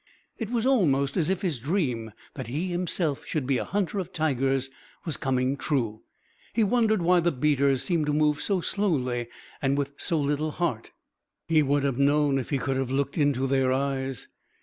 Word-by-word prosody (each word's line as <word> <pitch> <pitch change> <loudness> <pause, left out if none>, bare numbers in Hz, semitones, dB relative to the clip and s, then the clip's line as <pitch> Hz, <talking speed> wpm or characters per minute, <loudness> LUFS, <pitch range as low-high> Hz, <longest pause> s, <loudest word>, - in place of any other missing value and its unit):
It 225 -3 -3
was 235 -1 0
almost 140 - +2
as 170 -2 +1
if 190 +1 -1
his 165 -9 -1
dream 125 - -1 0.2
that - - -6
he 155 +10 -2
himself 175 -4 -1
should 150 -5 -2
be 130 -2 +1
a - - -1
hunter 200 0 -1
of 185 -1 -5
tigers 135 -5 0 0.3
was 160 - 0
coming 130 0 0
true. 130 -6 -1 0.5
He 225 - +3
wondered 220 -3 +2
why 180 +1 +4
the 175 0 +2
beaters 140 -1 +2
seemed 165 -5 0
to - - +2
move 150 0 +2
so 195 -3 0
slowly 130 - 0 0.3
and 140 0 +1
with 140 0 -2
so 165 - 0
little 145 +2 0
heart. 150 -8 -2 0.6
He 160 -2 +4
would 145 0 +1
have 135 -2 0
known 145 0 +3
if 130 - -5
he 140 - +1
could 135 0 -1
have 135 -2 -1
looked 140 +1 -1
into 145 -4 +2
their 135 -1 +2
eyes. 135 -2 -2
145 Hz, 190 wpm, -26 LUFS, 135-170 Hz, 0.6 s, why